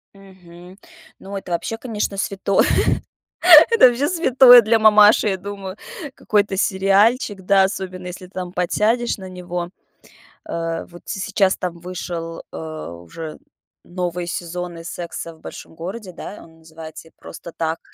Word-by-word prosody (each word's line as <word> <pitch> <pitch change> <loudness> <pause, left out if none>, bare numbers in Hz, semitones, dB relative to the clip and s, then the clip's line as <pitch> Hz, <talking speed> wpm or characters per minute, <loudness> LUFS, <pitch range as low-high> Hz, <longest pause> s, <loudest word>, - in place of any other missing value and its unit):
Мгм. 185 -1 -15 0.4
Ну 195 +1 -7
это 185 -2 -8
вообще, 225 +6 -3
конечно, 210 -4 -4
святое. 195 0 +1 1.0
Это 460 - +7
вообще 250 +4 0
святое 260 -8 +7
для 225 +1 +2
мамаши, 215 0 +6
я 190 - -1
думаю. 195 -1 -7 0.4
Какой-то 205 -2 0
сериальчик, 195 +3 +2
да, 195 +1 +4
особенно 185 -2 -5
если 180 +1 -9
там 180 -1 -7
подсядешь 215 +7 0
на 190 -1 -9
него. 180 -1 -5 0.8
Э, 165 0 -4
вот 175 0 -15
се 195 - -4
сейчас 195 -1 +1
там 175 -2 -4
вышел, 170 -2 -6
а, 155 - -7
уже 120 - -9 0.5
новый 180 -1 -4
сезон 175 0 -5
из 165 - -8
"Секса 170 -1 -7
в 160 - -23
Большом - - -11
Городе", 185 +4 -7
да, 205 - -9
он 165 0 -19
называется 160 0 -12
"И - - -32
просто 170 +1 -11
так". 160 0 -3
185 Hz, 145 wpm, -20 LUFS, 170-205 Hz, 1.0 s, Это